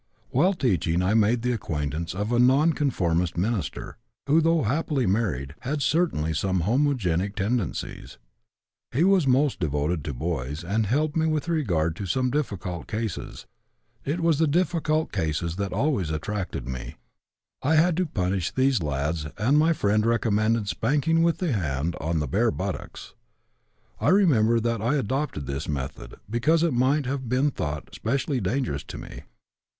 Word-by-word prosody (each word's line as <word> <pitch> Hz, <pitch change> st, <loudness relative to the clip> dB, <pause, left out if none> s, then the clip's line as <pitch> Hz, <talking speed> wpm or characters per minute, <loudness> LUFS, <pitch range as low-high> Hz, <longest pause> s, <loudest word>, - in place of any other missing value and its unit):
"While 180 Hz, +9 st, +3 dB
teaching 90 Hz, -, +1 dB
I 95 Hz, +3 st, +2 dB
made 115 Hz, +2 st, +3 dB
the 125 Hz, -, +1 dB
acquaintance 80 Hz, -, -3 dB
of 105 Hz, +4 st, -2 dB
a 120 Hz, -, +2 dB
non 135 Hz, +6 st, +5 dB
conformist 90 Hz, -, 0 dB
minister, 105 Hz, +2 st, -2 dB, 0.3 s
who, 155 Hz, +4 st, +4 dB
though 165 Hz, -1 st, +2 dB
happily 140 Hz, +2 st, 0 dB
married, 90 Hz, -, -1 dB
had 140 Hz, +2 st, -2 dB
certainly 135 Hz, -, +1 dB
some 95 Hz, +3 st, 0 dB
homogenic 105 Hz, -, +1 dB
tendencies. 105 Hz, -, -3 dB, 0.7 s
He 140 Hz, +7 st, +2 dB
was 190 Hz, -5 st, +4 dB
most 135 Hz, +2 st, +2 dB
devoted 75 Hz, +1 st, -1 dB
to 75 Hz, -, -3 dB
boys 75 Hz, +1 st, -3 dB
and 105 Hz, +5 st, 0 dB
helped 150 Hz, +7 st, 0 dB
me 160 Hz, 0 st, +2 dB
with 155 Hz, 0 st, -1 dB
regard 90 Hz, -, 0 dB
to 100 Hz, -, -4 dB
some 125 Hz, +7 st, 0 dB
difficult 95 Hz, -, -3 dB
cases. 110 Hz, -3 st, -4 dB, 0.6 s
It 155 Hz, +5 st, -2 dB
was 165 Hz, -3 st, +2 dB
the 160 Hz, -, +3 dB
difficult 160 Hz, -1 st, +1 dB
cases 85 Hz, -1 st, -2 dB
that 100 Hz, -1 st, -2 dB
always 130 Hz, -, 0 dB
attracted 80 Hz, -4 st, -3 dB
me. 65 Hz, -1 st, -6 dB, 0.7 s
I 160 Hz, +4 st, +2 dB
had 165 Hz, +2 st, +4 dB
to 185 Hz, -1 st, +1 dB
punish 95 Hz, -, -1 dB
these 130 Hz, -5 st, +2 dB
lads 75 Hz, +1 st, -2 dB
and 125 Hz, +7 st, +2 dB
my 160 Hz, +2 st, +4 dB
friend 105 Hz, -8 st, +1 dB
recommended 110 Hz, -1 st, +1 dB
spanking 150 Hz, +10 st, +1 dB
with 170 Hz, 0 st, +2 dB
the 180 Hz, -5 st, -1 dB
hand 80 Hz, -4 st, -1 dB
on 80 Hz, +3 st, -1 dB
the 75 Hz, -1 st, -1 dB
bare 110 Hz, -, +2 dB
buttocks. 95 Hz, -2 st, -5 dB, 0.9 s
I -, -, +2 dB
mention 120 Hz, -, +4 dB
that 115 Hz, -2 st, 0 dB
I 120 Hz, +7 st, +1 dB
adopted 135 Hz, -, -2 dB
this 70 Hz, +3 st, -4 dB
method, 65 Hz, -4 st, -5 dB
because 155 Hz, -, +2 dB
it 170 Hz, -5 st, +2 dB
might 130 Hz, +4 st, +2 dB
have 130 Hz, -2 st, -3 dB
been 130 Hz, +4 st, +2 dB
thought 75 Hz, -, -5 dB
specially 130 Hz, +2 st, -1 dB
dangerous 95 Hz, -, -1 dB
to -, -, -8 dB
me. -, -, -9 dB
115 Hz, 160 wpm, -25 LUFS, -, 0.9 s, non